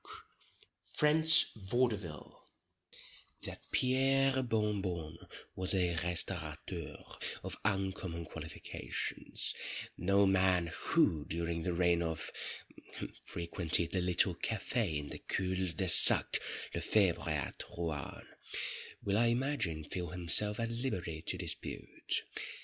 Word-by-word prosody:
—French 160 +2 +6
Vaudeville 105 -5 -2 1.0
That - - -3
Pierre 135 +1 +3
Bon 105 -4 0
Bon 85 -4 -4 0.4
was 95 +1 0
a 90 -2 +2
restaurateur 85 -1 -3 0.5
of - - -3
uncommon 95 -3 -2
qualifications, - - -5 0.5
no 100 +3 +4
man 95 -3 +3
who, 75 -2 +2
during 85 0 -2
the 90 +1 -1
reign 85 -1 +3
of——, 80 -2 -3 0.9
frequented 85 -1 -2
the 95 - 0
little 90 +1 +3
Câfé 100 -1 -1
in 75 0 -5
the - - -6
cul 95 -1 -1
de 95 +4 -1
sac 85 - +8 0.3
Le - - -2
Febre 95 -6 +2
at 75 -4 -2 0.2
Rouen, 80 -5 -4 0.8
will, 100 +1 +1
I 120 - +4
imagine, 120 - 0
feel 90 +2 -4
himself 90 +5 +1
at 115 0 -1
liberty 95 -10 -3
to - - -3
dispute. - - -4
90 Hz, 110 wpm, -34 LUFS, 85-105 Hz, 1.0 s, sac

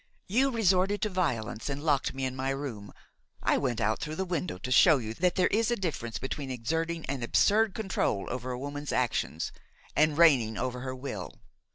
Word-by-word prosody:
You 255 +8 +3
resorted 200 -4 +2
to 215 - +1
violence 120 - -2
and 140 +1 -4
locked 145 -4 +1
me 135 0 -2
in 130 0 -3
my 130 +1 -2
room; 130 -8 -4 0.5
I - - +3
went 125 -4 -1
out 110 0 +1
through 155 +1 -4
the 190 - -2
window 175 - -2
to 130 +8 -6
show 155 +4 +7
you 110 -3 -4
that 180 +7 +1
there 185 - +3
is 225 +2 +2
a 240 - +2
difference 155 - -3
between 135 +1 -4
exerting 160 +7 -2
an 135 -1 -3
absurd 205 - +3
control 195 - -1
over 125 0 -4
a 125 - -3
woman's 145 +2 -5
actions 120 -9 -1 0.4
and 155 -1 +3
reigning 130 -10 +5
over 125 -1 -2
her 130 +1 -5
will. 130 +2 -6
140 Hz, 195 wpm, -29 LUFS, 125-180 Hz, 0.5 s, show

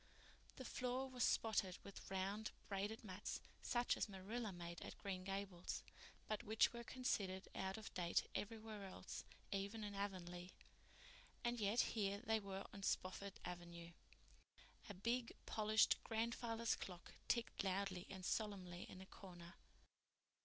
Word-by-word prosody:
The 260 - -5
floor 250 +2 0
was 250 -2 0
spotted 205 -5 +4
with 200 - -8
round, 195 +3 0 0.2
braided 205 +3 -1
mats, 195 -1 -2 0.2
such 240 -1 +3
as - - +1
Marilla 205 +4 -2
made 170 -1 -5
at - - -5
Green 190 -2 -2
Gables, 195 -2 -2 0.4
but 215 -1 0
which 220 +3 +5
were 235 0 -4
considered 200 -7 +1
out 190 +1 -1
of 220 - -6
date 175 -2 +3
everywhere 215 -2 -3
else, 185 - -5 0.3
even 200 +2 0
in 205 -1 -2
Avonlea. 180 -3 -2 0.9
And 240 0 +2
yet 210 +3 +5
here 200 -3 +2
they 220 -1 +5
were 195 -1 -3
on 200 - -6
Spofford 195 0 0
Avenue! 170 -1 -5 1.0
A 205 - -4
big, 230 +5 +1
polished 215 0 +5
grandfather's 230 0 +2
clock 180 -2 -6 0.2
ticked 235 -4 +2
loudly 190 -1 +1
and 190 -2 -5
solemnly 185 -5 0
in 185 - -7
a - - -7
corner. 175 -3 -9
200 Hz, 140 wpm, -45 LUFS, 185-220 Hz, 1.0 s, which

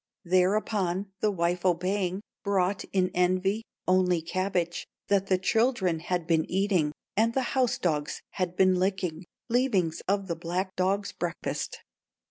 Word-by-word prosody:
"Thereupon 190 +1 +1
the 215 - +2
wife 175 -2 0
obeying, 185 +1 0 0.2
Brought, 195 -1 +1
in 185 -1 0
envy, 185 +4 +2 0.3
only 180 -1 +3
cabbage 175 0 -2 0.2
That 195 -1 +2
the 185 - +3
children 190 -4 +1
had 175 0 -2
been 160 -1 +1
eating, 185 -5 +2 0.2
And 225 +2 +2
the 265 - +2
house 255 -3 +2
dogs 150 -4 -1
had 180 -1 -2
been 185 -1 +4
licking, 185 -3 -1 0.2
Leavings 230 -9 +1
of 195 0 +1
the 170 - -2
black 180 +3 -3
dog's 195 +2 0
breakfast. - - -4
185 Hz, 135 wpm, -28 LUFS, 175-200 Hz, 0.3 s, been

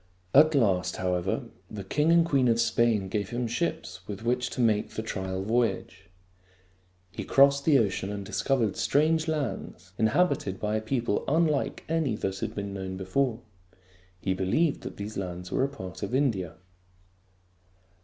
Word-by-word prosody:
At 155 +2 +6
last, 95 -8 +2
however, 90 0 -1 0.3
the 105 -2 -6
king 150 - +1
and 170 0 +5
queen 140 -6 +2
of 115 -1 +3
Spain 115 -3 +2
gave 100 0 -2
him 120 +1 -2
ships 120 - -3
with 105 +1 -6
which 125 +1 0
to - - -7
make 110 -3 +2
the 110 - -5
trial 95 -3 -3
voyage. 115 +3 -1 1.1
He - - -5
crossed 140 0 +4
the 150 -4 +6
ocean 100 -3 0
and 100 -1 -5
discovered 110 0 0
strange 160 +2 +2
lands, 145 -10 -4
inhabited 110 - +1
by 105 0 -1
a - - -2
people 115 -2 -1
unlike 155 -1 +1
any 160 -7 0
that 95 -2 -3
had - - -4
been 100 -1 -4
known 95 -1 -5
before. 115 +5 -1 0.8
He 95 +1 -1
believed 100 - +1
that - - -8
these 105 +2 -6
lands 90 -1 -5
were - - +1
a 135 - +1
part 95 -10 -9
of 105 +5 -2
India. 100 - 0
110 Hz, 160 wpm, -27 LUFS, 95-140 Hz, 1.1 s, At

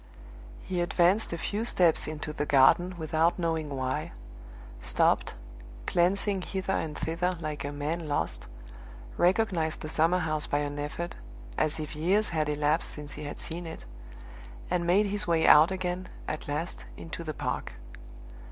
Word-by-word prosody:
He 180 -2 -2
advanced 175 +4 +3
a 170 - -2
few 210 +6 -2
steps 180 -8 +3
into 150 0 -4
the 150 -1 -2
garden 175 +7 +5
without 160 +1 +1
knowing 165 -3 -1
why 130 - -3 0.7
stopped, - - +2 0.5
glancing 190 +2 +1
hither 190 +1 -3
and 155 -4 -2
thither 175 +2 -1
like 155 -2 -4
a 145 - -3
man 155 +3 -3
lost 145 - -2 0.7
recognized 180 -4 +1
the 155 - -5
summer 165 +3 +3
house 155 -4 0
by 145 - 0
an 145 0 -2
effort, 150 +4 -4 0.4
as 155 0 0
if 155 0 -5
years 190 +8 +2
had 155 -3 0
elapsed 150 +2 +1
since 150 -1 -8
he 150 - -7
had 145 - -6
seen 170 +1 -4
it 160 - -8 0.9
and 175 -1 0
made 195 +4 +4
his 205 0 0
way 165 -1 +3
out 155 +3 +8
again, 185 -1 -3 0.2
at 155 - -4
last, 150 +4 -3
into 170 0 -7
the 155 -2 -5
park. - - -3
165 Hz, 155 wpm, -29 LUFS, 150-180 Hz, 0.9 s, out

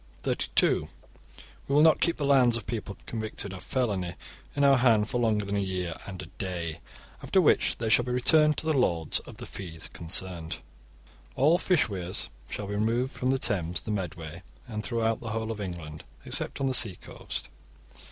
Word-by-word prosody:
(32) - - +2 0.8
We 140 - +1
will 150 - +7
not 160 -1 +5
keep 170 - +2
the 145 - -1
lands 130 -4 +5
of 115 - -7
people 105 -3 -4
convicted 110 -3 -4
of 95 - -8
felony 100 -9 -1 0.4
in 145 - +2
our 140 -1 +6
hand 115 -4 +4
for 120 - -1
longer 105 -3 +2
than 100 +1 -2
a - - +1
year 90 -3 -2
and 95 -2 -6
a 85 +2 -13
day, 85 -4 -3 0.4
after - - +2
which - - +3
they 115 - -2
shall 115 +2 +5
be 125 - -3
returned 150 +4 +4
to - - -3
the 160 - +2
lords 85 - +2
of - - -12
the - - -7
'fees' 85 -4 -6
concerned. 85 -1 -3 0.8
(33) - - -1
All 160 +4 +6
fish 180 -4 +3
weirs 90 -4 -3 0.2
shall 105 - -4
be 100 - -4
removed 115 +5 +1
from 130 -2 -2
the 135 - +3
Thames, 90 -8 -1
the 105 - -5
Medway, 85 -4 -4 0.3
and 110 -2 -4
throughout 115 -2 0
the 115 - -6
whole 110 0 -2
of 105 -2 -5
England, 85 -5 -6 0.2
except - - -3
on 135 - 0
the 130 - +1
sea 110 -7 +5
coast. - - -7
105 Hz, 195 wpm, -28 LUFS, 90-125 Hz, 0.8 s, will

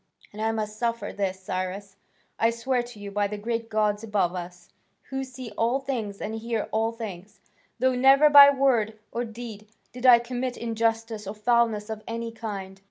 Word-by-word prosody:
And 215 - -7
I 220 0 +1
must 215 -1 -4
suffer 235 -1 -2
this, 190 -2 -2
Cyrus, 190 +2 -4 0.4
I 225 - +4
swear 240 +2 0
to 240 -3 -11
you 200 -1 -7
by 205 0 +1
the 210 +1 -5
great 230 +2 -3
gods 210 -1 0
above 205 -5 0
us, 180 0 -8 0.4
who 270 0 -2
see 255 -3 -9
all 235 +4 +1
things 235 -7 -4
and 215 - -4
hear 225 0 -3
all 225 +1 +1
things, 205 -4 -8 0.4
though 260 0 +2
never 270 +4 +6
by 285 -1 +10
word 250 -6 +2
or 240 - -2
deed 225 -2 -8 0.3
did 250 +1 -1
I 245 -1 +10
commit 245 +1 -4
injustice 225 -2 -1
or 200 - -5
foulness 225 -1 +2
of 220 -1 -5
any 230 0 -4
kind." 195 -4 -7
225 Hz, 180 wpm, -26 LUFS, 210-240 Hz, 0.4 s, by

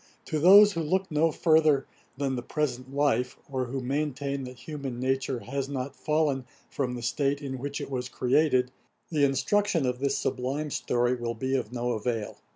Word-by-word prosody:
To 155 - -1
those 200 +6 +8
who 165 - -2
look 185 +4 0
no 155 +2 +3
further 155 -4 +3 0.3
than 135 -1 -1
the 120 - -3
present 130 -2 -3
life, 140 -3 +1
or 130 -1 -1
who 130 +2 -4
maintain 140 0 -2
that 125 0 -9
human 135 -2 -6
nature 130 -1 -1
has 135 +2 -3
not 135 -1 -4
fallen 150 -4 0 0.3
from 125 -3 -2
the 120 - -6
state 140 +3 0
in 135 -3 -5
which 140 +2 -4
it - - -6
was 125 -1 -3
created, 130 0 +2 0.4
the 150 -3 +2
instruction 165 +5 +2
of 125 -1 -1
this 140 0 0
sublime 135 +4 -2
story 120 -1 +1
will 120 -1 -3
be 130 +4 -1
of 120 -4 -2
no 120 0 -2
avail. 115 -1 -3
135 Hz, 180 wpm, -28 LUFS, 125-150 Hz, 0.4 s, those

